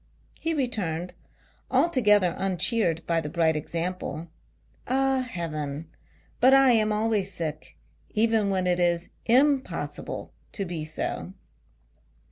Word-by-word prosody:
He 325 0 -1
returned, 180 - -2 0.6
altogether 220 - +3
uncheered 190 -2 +1
by 165 -1 +1
the 150 - -5
bright 160 -1 +2
example, 170 +1 -4 0.3
" - - -40 0.2
Ah, 270 +1 +2
Heaven, 160 - -4 0.5
but 260 +2 +6
I 270 -1 +6
am 215 -2 +3
always 210 -2 +1
sick, 155 -4 -5 0.3
even 220 -1 +2
when 190 -1 0
it 180 0 +2
is 175 0 +1 0.2
impossible 265 +3 0 0.2
to 200 - -2
be 170 -3 -4
so." 155 - -3
190 Hz, 115 wpm, -26 LUFS, 165-240 Hz, 0.6 s, but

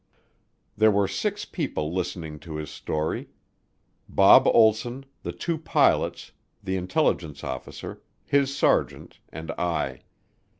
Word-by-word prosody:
There 110 +1 +5
were 100 -1 +2
six - - -2
people 75 +2 -3
listening 85 -4 -4
to 80 -1 -8
his 75 -1 -5
story. 75 0 -3 0.8
Bob - - +7
Olsson, 120 +4 +3 0.2
the - - -4
two 170 -2 -3
pilots, 160 - +1 0.3
the 95 -1 -2
intelligence 90 -5 -1
officer, 65 -2 -6 0.2
his 140 -1 +2
sergeant, - - 0
and 80 +1 -6
I. 75 -7 -1
90 Hz, 115 wpm, -25 LUFS, 75-110 Hz, 0.8 s, Bob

